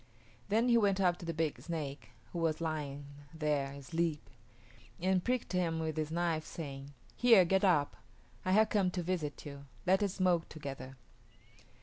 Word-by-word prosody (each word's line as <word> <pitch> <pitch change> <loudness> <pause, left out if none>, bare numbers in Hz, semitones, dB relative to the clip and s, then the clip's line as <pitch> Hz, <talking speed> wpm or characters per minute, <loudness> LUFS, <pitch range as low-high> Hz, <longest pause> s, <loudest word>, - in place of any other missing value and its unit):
Then 225 +4 +3
he 235 -1 +5
went 200 -2 +2
up 180 -2 +3
to 170 - -8
the - - 0
big 160 -1 -1
snake, 150 -5 -5 0.2
who 175 - -2
was 160 -2 +1
lying 150 -3 -3 0.3
there 150 -3 0
asleep, 155 +3 -2 0.7
and 185 0 +2
pricked 250 -5 -1
him 170 -3 +1
with 160 -1 -2
his 155 -1 -1
knife, 165 -1 0
saying, 140 -3 -7 0.2
"Here, 230 -7 +6
get 190 +3 +2
up; 160 -7 +3 0.5
I 185 - +1
have 215 +2 +5
come 200 -3 +2
to 175 - 0
visit 165 -5 -3
you. 140 -1 -8 0.2
Let 190 +2 +4
us 200 -2 0
smoke 180 -3 +2
together." 135 -3 -7
165 Hz, 165 wpm, -33 LUFS, 150-185 Hz, 0.7 s, Here